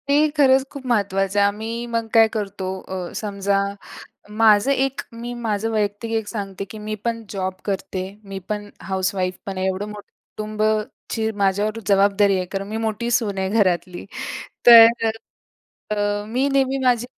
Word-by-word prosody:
ते 280 - +4 0.2
खरंच 265 -2 +5
खूप 280 -2 -9
महत्त्वाचं 200 -3 +1
आहे. 200 - +5
आम्ही 225 +3 -4
मग 230 -1 -2
काय 225 -1 +7
करतो 200 -3 -3 0.2
अ, 185 -2 -5
समजा, 200 -1 0 0.7
माझं 215 +3 +4
एक 270 0 0
मी 235 +1 -6
माझं 225 -2 -2
वैयक्तिक 210 +1 -1
एक 220 -2 -1
सांगते, 195 -3 -5
की 215 - -10
मी 215 0 -4
पण 230 -1 -1
जॉब 190 -2 -2
करते. 190 -2 -3 0.2
मी 195 -1 -7
पण 205 -1 -3
हाउसवाईफ 185 -1 -1
पण 195 -1 -5
आहे. 185 0 0
एवढं 190 +2 -2
मोठं 210 -1 -10 0.3
कुटुंबाची 215 +1 -2
माझ्यावर 205 +3 +1
जबाबदारी 200 0 +4
आहे. 185 - -2
कारण 195 0 -3
मी 215 +2 -4
मोठी 225 +2 -2
सून 215 -4 +1
आहे 190 0 -1
घरातली. 185 -4 0 0.6
तर 230 -1 +9 0.8
अ, 205 0 0
मी 255 +5 +1
नेहमी 270 0 +2
माझी 245 -1 +2
210 Hz, 155 wpm, -22 LUFS, 195-230 Hz, 0.8 s, तर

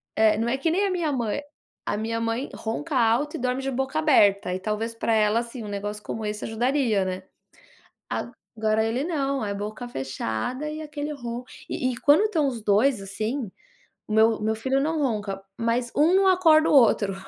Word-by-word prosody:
É, 215 -1 +4
não 230 +1 0
é 260 +3 0
que 325 +4 0
nem 395 +4 +2
a - - -1
minha 335 -5 0
mãe. 240 0 -1 0.4
A 205 - -1
minha 230 +1 -2
mãe 230 +4 -2
ronca 280 +7 -4
alto 245 +5 +2
e - - -4
dorme 250 +1 -1
de 270 - -2
boca 270 +3 -1
aberta 200 -11 +4
e 185 - -2
talvez 220 +3 -3
para 230 0 0
ela, 215 +1 +3
assim, 235 0 -6
um - - -7
negócio 205 +1 -4
como 220 0 -5
esse 210 0 -3
ajudaria, 235 -2 +1
né. 185 0 -4 0.9
Agora 220 -1 -2
ele 235 +4 -1
não, 275 -6 -1
é 200 - -2
boca 215 +4 -5
fechada 135 - -3
e 310 +1 -6
aquele 300 -1 -5
ronco 240 -2 -6 0.2
e 255 - -1
e - - -6
quando 290 +10 +5
estão 330 -9 +1
os 240 -5 -3
2, 215 +3 +3
assim, 215 +4 -3 0.6
meu 220 +1 +3
meu 220 +1 +1
filho 265 +5 0
não 315 +1 0
ronca, 205 -7 -2 0.2
mas 235 +1 0
um 320 +5 +4
não 390 0 +4
acorda 325 -4 +5
o - - +2
outro. 215 -7 +4
235 Hz, 195 wpm, -25 LUFS, 215-280 Hz, 0.9 s, quando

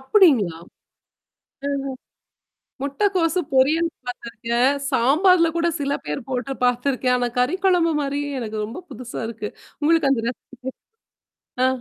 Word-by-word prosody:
அப்படிங்களா? 265 - +4 1.1
அ - - -1 0.2
அ. - - -2 0.9
முட்டைக்கோசு 345 +3 +1
பொரியல் 305 +6 +4 0.2
பார்த்துருக்கேன், 235 +1 0 0.2
சாம்பார்ல 335 +8 +4
கூட 340 0 +2
சில 280 0 0
பேர் 150 +9 -4
போட்டு 255 +1 -2
பார்த்துருக்கேன். 250 +1 +2
ஆனா 245 -1 0
கறி 250 +8 +2
குழம்பு 355 -3 +4
மாரியே 285 0 -2
எனக்கு 220 -2 -5
ரொம்ப 225 +10 -7
புதுசா 250 -1 -7
இருக்கு. 220 -2 -5 0.3
உங்களுக்கு 310 -2 +3
அந்த 250 -4 +2
ரெசிபி 260 +1 -7 0.9
ஆ. - - +5
270 Hz, 120 wpm, -22 LUFS, 245-330 Hz, 1.1 s, ஆ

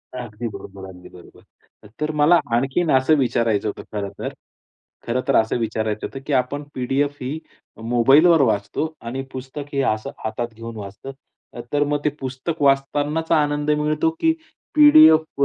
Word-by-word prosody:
अगदी 120 -2 -6
बरोबर, 100 -2 -9
अगदी 90 -1 -13
बरोबर. 90 - -16 0.6
तर 150 +1 0
मला 165 +4 +6 0.2
आणखीन 135 +7 0
असं 130 +4 +4
विचारायचं 115 -5 +1
होतं 105 - -5
खरं 100 -2 -3
तर, - - -4 0.7
खरं 120 +2 0
तर - - +2
असं 110 +1 +2
विचारायचं 110 -1 -2
होतं 135 - -9
की 150 - -1
आपण 135 +3 0
पी-डी-एफ 135 +3 -1
ही 135 +5 -4 0.5
मोबाईलवर 140 +8 +5
वाचतो 110 +6 -1
आणि 120 +3 -5
पुस्तक 130 +3 -7
हे 140 - +1
असं 110 0 -6 0.2
हातात 110 +2 -2
घेऊन 115 +1 -8
वाचतो. 100 +6 -8 0.6
तर 145 0 +3
मग 145 0 0
ते - - +4
पुस्तक 135 +5 -5
वाचतांनाच 145 +3 +1
आनंद 150 -1 +2
मिळतो, 150 +1 +1
की 325 - +3 0.4
पी-डी-एफ 295 - +6
135 Hz, 150 wpm, -21 LUFS, 115-150 Hz, 0.7 s, मला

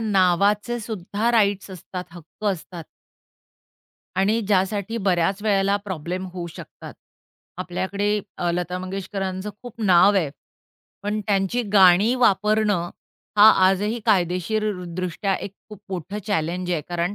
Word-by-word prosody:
नावाचेसुद्धा 210 +2 +1
rights 200 -3 +2
असतात, 180 0 -7
हक्क 175 +4 -13
असतात. 170 -2 -9 1.3
आणि 210 +4 +2
ज्यासाठी 200 +2 0
बऱ्याच 185 +3 +1
वेळेला 200 -2 +2
प्रॉब्लेम 185 0 -4
होऊ 175 -2 -5
शकतात. - - -11 0.6
आपल्याकडे 200 +3 -1 0.2
अ, 175 - -1
लता 180 +1 -2
मंगेशकरांचं 190 +1 -4
खूप 240 -2 -10
नाव 185 +1 +5
आहे. 160 -7 +1 0.7
पण 210 +1 -2
त्यांची 200 +4 0
गाणी 195 +4 +6
वापरणं 210 -5 +2 0.5
हा 210 +2 +10 0.2
आजही 210 +5 0
कायदेशीर 200 +2 +1 0.3
दृष्ट्या 185 +2 -1
एक 195 - -6 0.2
खूप 210 - -10
मोठं 190 +3 -4
चॅलेंज 180 -2 -1
आहे. 165 -3 0
कारण 175 +2 -1
195 Hz, 115 wpm, -23 LUFS, 180-210 Hz, 1.3 s, हा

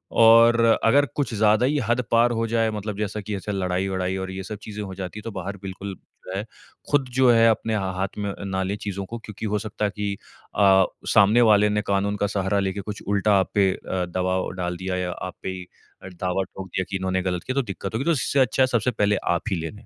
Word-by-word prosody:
और 115 +1 +7 0.2
अगर 140 +6 +5
कुछ 140 -5 -1
ज़्यादा 110 +2 +4
ही 150 +2 +1
हद 120 +2 +2
पार 115 +1 +4
हो 115 -1 0
जाए 115 0 +1
मतलब 105 -1 -5
जैसा 105 0 -3
कि 105 +1 -4
ऐसे 100 +2 -5
लड़ाई-वड़ाई 95 0 -1
और 95 0 -4
ये 95 0 -5
सब 105 +2 -6
चीज़ें 105 -1 -6
हो 95 -2 -7
जाती 95 +2 -6
हैं - - -12
तो 115 - -5
बाहर 100 0 -5
बिल्कुल 95 +1 -6 0.3
रहें। 95 +2 -3 0.5
ख़ुद 145 -2 +3
जो 130 -1 +5
है 115 -1 +5
अपने 110 0 0
हा 95 -2 -1
हाथ 95 +1 -2
में 100 -1 -2
ना 95 -1 -2
ले 95 +2 -2
चीज़ों 100 -2 -5
को 115 +5 -6
क्योंकि 110 -1 -8
हो 105 0 0
सकता 105 0 -3
है 100 - 0
कि 105 -1 -2 0.4
अ, 95 -2 +5 0.3
सामने 105 +5 +6
वाले 105 -2 +5
ने 105 0 +1
कानून 100 +1 +1
का 100 - 0
सहारा 100 0 0
लेके 95 0 -2
कुछ 105 +1 -7
उल्टा 100 +1 +2
आप 95 - -1
पे 100 -2 +4
अ, 95 -1 -3
दबाव 95 +1 -1
डाल 90 0 -2
दिया 95 +1 -3
या 90 -1 -2
आप 90 +1 -6
पे - - -3
ही 90 -1 -6 0.4
दावा 90 +1 -2
ठोक 95 0 -9
दिया 95 +1 -2
कि 95 - -2
इन्होने 95 0 -1
ग़लत 90 -2 -2
किया 130 - -4
तो 140 - +3
दिक़्क़त 100 -4 -6
होगी 130 +5 -1
तो 170 - +3
इससे 140 -1 +1
अच्छा 130 0 +3
है - - +3
सबसे 125 0 +1
पहले 105 -2 +1 0.2
आप 85 - -3
ही - - +2
ले 80 - -4
लें। 105 - -15
100 Hz, 245 wpm, -24 LUFS, 95-110 Hz, 0.5 s, और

